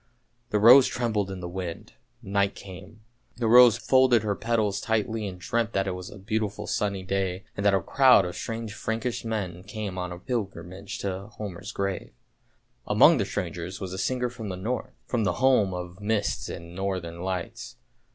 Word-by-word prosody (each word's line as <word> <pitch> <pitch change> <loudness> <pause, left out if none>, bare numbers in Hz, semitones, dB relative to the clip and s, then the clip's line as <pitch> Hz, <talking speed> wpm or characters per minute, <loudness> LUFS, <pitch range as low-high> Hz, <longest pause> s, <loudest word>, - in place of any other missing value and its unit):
The 105 - +1
rose 125 +5 +8
trembled 110 -5 -1
in 95 -1 -6
the 90 - -4
wind. 90 -1 -6 0.3
Night 100 -1 0
came; 95 +3 -11 0.4
the 120 - -2
rose 120 0 +8
folded 130 -3 +4
her 105 -1 0
petals 110 -2 0
tightly 110 -1 -1
and 95 -2 -7
dreamt 115 +3 -1
that 95 0 +1
it 95 - -1
was 90 0 -6
a - - -11
beautiful 105 +1 -2
sunny 100 -3 -1
day, 95 0 -2
and 100 - -3
that 100 -1 +4
a 95 - +1
crowd 130 -6 +5
of 90 - -5
strange 115 -2 -5
Frankish 115 +3 -3
men 100 -6 -3
came 100 -2 -5
on 90 -1 -4
a 85 - -6
pilgrimage 95 -3 -5
to 95 0 -4
Homer's 105 -2 -7
grave. 100 -1 -3 0.7
Among - - +6
the - - +1
strangers 90 +1 -4
was 95 -1 -5
a 95 - -5
singer 125 +4 -1
from 110 -4 -7
the 95 - -3
North, 115 +6 -3 0.2
from 120 -3 -1
the 105 - +1
home 125 -6 +3
of 90 +1 -7
mists 105 -1 -1
and 85 +1 -8
northern 90 -3 -3
lights. 95 -2 -4
100 Hz, 180 wpm, -26 LUFS, 95-110 Hz, 0.7 s, rose